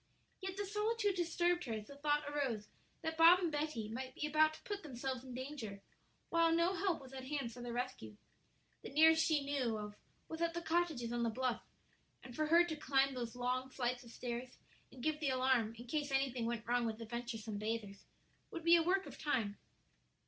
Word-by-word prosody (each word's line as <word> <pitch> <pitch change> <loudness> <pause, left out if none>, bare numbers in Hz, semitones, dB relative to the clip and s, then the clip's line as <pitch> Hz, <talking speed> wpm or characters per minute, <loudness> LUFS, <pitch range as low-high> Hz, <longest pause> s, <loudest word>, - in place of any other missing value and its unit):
Yet 380 0 -4
the 405 - -1
solitude 420 +1 +1
disturbed 350 0 +1
her 235 - -3
as 215 -1 -4
the 280 - -11
thought 295 +1 +1
arose 265 -8 -2 0.3
that 320 0 -3
Bob 335 +2 +9
and 350 -3 -1
Betty 295 -7 -2
might 255 +4 -5
be - - -2
about 310 +1 +4
to - - -15
put 410 -1 -4
themselves 260 -4 -4
in 255 -2 -8
danger, 255 -7 -5 0.5
while 335 -1 +4
no 335 +3 +3
help 370 -2 0
was 265 -1 -12
at 260 -1 -6
hand 270 -4 -3
for 245 - -9
their 240 0 -5
rescue. 235 - -4 0.6
The - - -7
nearest 320 +2 +6
she 300 -3 +2
knew 260 -6 0
of 210 -1 -6 0.3
was 320 +1 -6
at 335 0 +1
the 340 - -2
cottages 320 -9 0
on 240 - 0
the 235 - +2
bluff, 250 +1 -1 0.6
and 250 -2 -10
for 310 0 0
her 335 +2 +7
to 340 -2 -3
climb 275 -2 +2
those 240 -2 -4
long 250 +1 -1
flights 250 -1 -2
of 235 - -13
stairs 245 +1 -5 0.3
and 255 -2 -11
give 310 -1 +1
the 295 -3 +1
alarm 255 -4 +2
in 240 - -9
case 295 +3 -1
anything 265 -3 0
went 235 -1 -3
wrong 240 0 +2
with 220 -1 -3
the 230 - -7
venturesome 225 -2 -4
bathers, 210 -2 -4 0.4
would 335 - -6
be 335 +1 +7
a 335 - +5
work 375 +3 +2
of - - -10
time. 225 -8 -1
265 Hz, 210 wpm, -37 LUFS, 240-320 Hz, 0.6 s, Bob